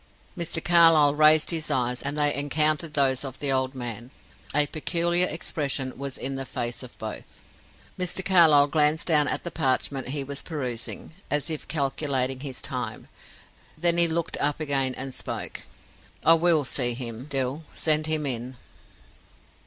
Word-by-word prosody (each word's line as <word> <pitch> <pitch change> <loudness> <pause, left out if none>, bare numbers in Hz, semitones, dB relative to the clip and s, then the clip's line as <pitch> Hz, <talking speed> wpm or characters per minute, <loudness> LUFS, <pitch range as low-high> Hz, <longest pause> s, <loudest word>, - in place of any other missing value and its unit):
Mr. 170 -2 +2
Carlyle 165 -4 +5
raised 155 +1 +4
his 160 -2 -2
eyes, 125 -1 0
and 140 +1 -4
they 145 -1 +2
encountered 150 +2 0
those 135 -2 +2
of 135 -2 -7
the 140 -2 0
old 130 0 0
man; 120 -1 -6 0.4
a 150 +1 +3
peculiar 170 +3 +1
expression 140 -4 -3
was 140 -1 -5
in 135 - -3
the 135 0 -4
face 120 -2 -4
of 125 -2 -12
both. 110 -1 -8 0.6
Mr. 180 +1 +1
Carlyle 165 -6 +6
glanced 150 +1 +1
down 150 -3 +2
at - - -2
the 170 - -5
parchment 135 -2 -1
he 140 +2 -2
was 140 +1 -4
perusing, 130 -8 -5 0.2
as 150 +2 -1
if 155 - -5
calculating 135 -3 -1
his 135 -2 -6
time. 120 -4 -5 0.7
Then 170 +1 +2
he 170 - +5
looked 165 0 -2
up 145 +1 0
again 135 -4 0
and 135 0 -6
spoke. - - -5 0.6
"I 165 - +8
will 165 -2 +3
see 125 -2 +1
him, 120 0 -6
Dill. 135 +1 -1
Send 155 -1 +3
him 155 -1 0
in." 125 -1 -3
145 Hz, 160 wpm, -25 LUFS, 130-155 Hz, 0.7 s, I